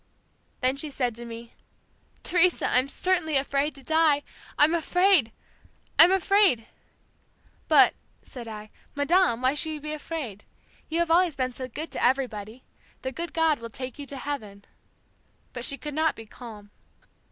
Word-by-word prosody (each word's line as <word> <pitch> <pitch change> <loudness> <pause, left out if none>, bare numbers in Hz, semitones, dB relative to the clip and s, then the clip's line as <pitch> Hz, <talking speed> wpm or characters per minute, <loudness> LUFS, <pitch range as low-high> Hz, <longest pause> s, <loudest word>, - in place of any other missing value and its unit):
"Then 260 +1 +2
she 300 +2 0
said 250 -4 -1
to 235 +2 -9
me, 230 0 -9 0.7
'Teresa, 355 0 +3
I'm 255 +2 +2
certainly 320 -1 0
afraid 280 +2 0
to 275 - -13
die! 315 -1 +3 0.3
I'm 300 +3 +5
afraid! 345 - +3 0.7
I'm 335 +3 +9
afraid!" 385 - +3 1.0
"'But,' - - +6 0.3
said 240 -3 -10
I, 215 -1 -9 0.2
'Madame, 285 -4 +2
why 260 +1 +3
should 315 +1 0
you 305 - -5
be 300 +1 -4
afraid? 290 -10 -6 0.5
You 325 - -1
have 340 -1 0
always 345 -2 +3
been 255 -1 -2
so 255 +1 -6
good 305 +6 -7
to - - -3
everybody. 245 -3 -1 0.4
The 260 - -3
good 340 +5 -6
God 320 -3 +2
will 230 0 -8
take 255 +4 -7
you 285 - -6
to 275 - -5
heaven.' 215 -8 -6 0.9
But 245 0 -4
she 275 - +1
could 295 0 -7
not 315 +2 +1
be 225 - -10
calm. 210 -3 -12
280 Hz, 160 wpm, -26 LUFS, 240-320 Hz, 1.0 s, I'm